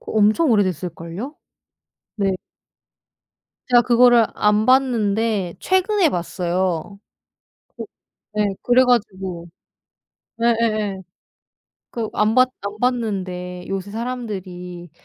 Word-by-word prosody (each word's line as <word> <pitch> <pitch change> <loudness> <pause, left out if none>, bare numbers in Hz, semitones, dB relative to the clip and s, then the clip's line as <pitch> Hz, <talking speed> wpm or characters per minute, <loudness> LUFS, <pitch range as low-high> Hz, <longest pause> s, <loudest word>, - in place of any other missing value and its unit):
그 - - -8
엄청 220 +8 +3
오래됐을걸요? 185 - -2 0.8
네. 195 -3 +1 1.3
제가 245 -1 +6
그거를 240 -1 +5
안 210 +1 +2
봤는데 225 -7 +2
최근에 375 -1 +2
봤어요. 180 +1 -2 0.8
그 - - -5 0.5
네 210 0 +1 0.2
그래 245 +1 +5
가지고 195 -8 -1 0.9
예예예. 215 -4 +1 0.9
그 225 -2 -4
안 210 +1 +1
봤 255 0 +5
안 200 +1 -6
봤는데 185 -7 -2
요새 195 0 -4
사람들이 190 -7 -6
210 Hz, 190 characters per minute, -21 LUFS, 185-240 Hz, 1.3 s, 제가